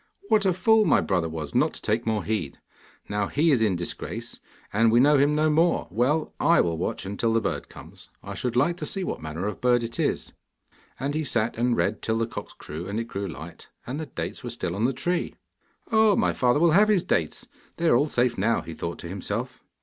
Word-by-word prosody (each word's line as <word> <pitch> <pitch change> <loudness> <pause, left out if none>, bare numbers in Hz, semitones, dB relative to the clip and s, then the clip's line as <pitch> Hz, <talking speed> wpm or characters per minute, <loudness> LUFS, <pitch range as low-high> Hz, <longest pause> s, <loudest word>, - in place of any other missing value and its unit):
'What 210 -2 +4
a 185 - +3
fool 220 +5 +4
my - - +4
brother 90 -4 0
was 80 -3 -6
not - - +2
to - - -7
take 110 +2 0
more 110 -2 0
heed! 105 -10 -3 0.5
Now 105 -1 -1
he 155 +3 +2
is 130 -5 +3
in 105 -4 +2
disgrace, 85 0 -5 0.3
and 115 +2 +4
we 120 - +5
know 145 +2 +5
him 145 +2 +3
no 155 0 +3
more. 165 +3 +2
Well, 130 - +1
I 170 +3 +4
will 85 -1 +2
watch 90 - -3
till 115 -1 +2
the 115 - +4
bird - - -3
comes. - - -13
I - - -6
should 125 -2 -3
like 145 +8 +2
to - - -4
see 195 - -3
what - - -4
manner 80 +4 -4
of 105 -1 -4
bird 125 -1 +3
it 115 0 -5
is.' - - -1 0.7
And 140 +3 -2
he 155 +1 -1
sat 115 -5 0
and 120 +1 +1
read 105 +2 0
till 110 0 0
the 115 - +1
cocks 115 - -8
crew 80 +4 -8
and 100 +3 -2
it - - -1
grew 100 -3 -4
light, 80 +1 -10 0.2
and 135 +5 -4
the 160 - -5
dates - - -6
were - - -4
still 85 - -3
on 105 +4 0
the 130 - +2
tree. 175 +6 -2 0.6
'Oh 220 -2 +5
my - - +2
father 125 +2 +2
will 170 0 +4
have 205 +6 +5
his 205 -5 +3
dates; 80 -3 -1 0.3
they 170 - 0
are 120 - +5
all 145 +5 +2
safe 120 -4 +1
now,' 115 +4 +2
he 80 - -8
thought 85 +2 -5
to - - -7
himself. 105 +7 -4
120 Hz, 235 wpm, -25 LUFS, 100-150 Hz, 0.7 s, we